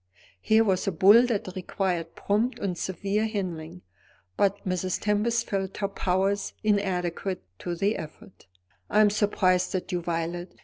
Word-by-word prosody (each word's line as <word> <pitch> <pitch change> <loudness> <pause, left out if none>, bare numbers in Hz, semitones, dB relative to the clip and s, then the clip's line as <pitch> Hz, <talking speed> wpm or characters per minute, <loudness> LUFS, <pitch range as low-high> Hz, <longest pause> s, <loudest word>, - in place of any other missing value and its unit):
Here 220 - +4
was 190 -3 0
a - - +2
bull 205 +8 +6
that 220 -6 -1
required 180 -2 -2
prompt 220 +5 0
and 190 -3 -2
severe 195 +5 -1
handling, 180 -5 -5 0.5
but 200 0 +2
Mrs. 185 0 -1
Tempest 215 +3 +1
felt 195 -1 -3
her 200 - 0
powers 195 +1 0
inadequate 190 -3 -1 0.2
to 175 - -3
the 200 +5 0
effort. 155 - -11 0.4
"I 215 - +4
am 210 -1 +5
surprised 190 -3 +1
at 185 - -3
you, 175 -1 -1
Violet!" 170 +1 -4
195 Hz, 145 wpm, -27 LUFS, 180-205 Hz, 0.5 s, bull